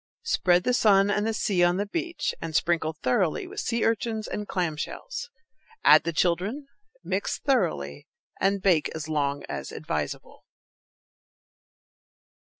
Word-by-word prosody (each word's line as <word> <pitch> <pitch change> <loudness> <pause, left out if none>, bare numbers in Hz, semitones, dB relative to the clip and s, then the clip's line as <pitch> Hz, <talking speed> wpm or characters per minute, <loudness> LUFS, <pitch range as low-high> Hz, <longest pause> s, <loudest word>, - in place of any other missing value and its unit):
Spread 180 - +3
the 250 - +1
sun 200 -4 +4
and 210 +2 0
the - - +1
sea 190 -4 +1
on 175 +1 +3
the 205 - 0
beach, 335 - -3
and 160 -1 -5
sprinkle 165 -2 +1
thoroughly 160 - +1
with 390 +3 -7
sea 230 -1 0
urchins 225 0 -1
and 210 0 -4
clam 175 -4 -1
shells. 485 - -6 0.5
Add - - +7
the 170 - 0
children, 185 - 0 0.4
mix - - -2
thoroughly, 165 - -1 0.3
and 195 0 +1
bake 175 -6 +3
as 160 -1 -5
long 145 -2 -1
as - - -6
advisable. - - -5
195 Hz, 140 wpm, -26 LUFS, 165-225 Hz, 0.5 s, Add